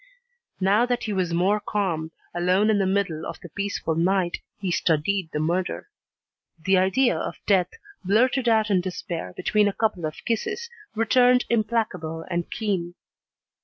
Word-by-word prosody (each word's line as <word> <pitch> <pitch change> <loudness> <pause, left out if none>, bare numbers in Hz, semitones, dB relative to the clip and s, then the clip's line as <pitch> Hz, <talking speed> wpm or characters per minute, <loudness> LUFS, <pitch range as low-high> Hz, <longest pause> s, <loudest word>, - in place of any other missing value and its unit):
Now 205 +5 +3
that 245 -1 -1
he 215 - -2
was 185 -3 0
more 185 +5 +2
calm, 180 -7 -2 0.2
alone 185 +5 +2
in 205 - +2
the 195 - +2
middle 190 -5 0
of - - -6
the 175 - -11
peaceful 200 -2 -2
night, 175 +2 +1 0.2
he 190 -3 -2
studied 170 +2 +1
the 150 - -2
murder. 175 - -1 0.7
The 190 +3 +3
idea 240 +8 +3
of - - -4
death, 185 -3 +3 0.3
blurted 240 +6 +2
out 220 -2 +3
in 185 -2 +3
despair 175 - -5
between 210 -1 +2
a 200 - 0
couple 195 -8 0
of 155 - -9
kisses, 465 - -2 0.2
returned 250 +3 +4
implacable 215 -8 -1
and 175 0 -2
keen. 185 -6 -2
195 Hz, 155 wpm, -24 LUFS, 175-215 Hz, 0.7 s, returned